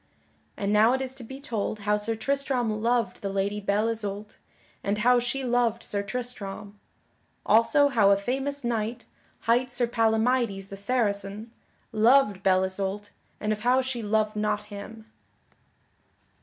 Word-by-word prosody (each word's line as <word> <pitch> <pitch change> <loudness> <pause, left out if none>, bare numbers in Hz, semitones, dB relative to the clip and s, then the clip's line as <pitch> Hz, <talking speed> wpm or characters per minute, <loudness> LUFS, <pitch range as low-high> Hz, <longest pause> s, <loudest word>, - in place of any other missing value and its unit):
And 200 0 -1
now 220 +3 +5
it 265 - 0
is 260 0 -4
to 265 -2 -11
be 265 +4 -9
told 215 -5 -3
how 210 +1 +2
Sir 210 +2 -2
Tristram 245 -3 -1
loved 235 -4 0
the 200 - -3
Lady 200 +1 -1
Belle 205 +2 +1
Isoult 210 -2 -4 0.5
and 200 +1 0
how 245 +3 +4
she 245 +3 -2
loved 240 -2 +1
Sir 200 - -2
Tristram. 205 -2 -6 0.7
Also 230 +7 +5
how 225 -8 +4
a 200 - +5
famous 270 +6 -2
knight, 235 0 -2 0.4
hight 245 +2 +2
Sir 245 0 0
Palamydes 225 -3 +1
the 195 - -7
Saracen, 205 0 -2 0.4
loved 225 -2 +4
Belle 190 -1 +3
Isoult 195 +2 -2 0.3
and 215 0 0
of 210 - -5
how 250 +4 +3
she 260 -2 -2
loved 215 0 0
not 210 0 -1
him. 215 +2 -9
220 Hz, 150 wpm, -26 LUFS, 205-245 Hz, 0.7 s, now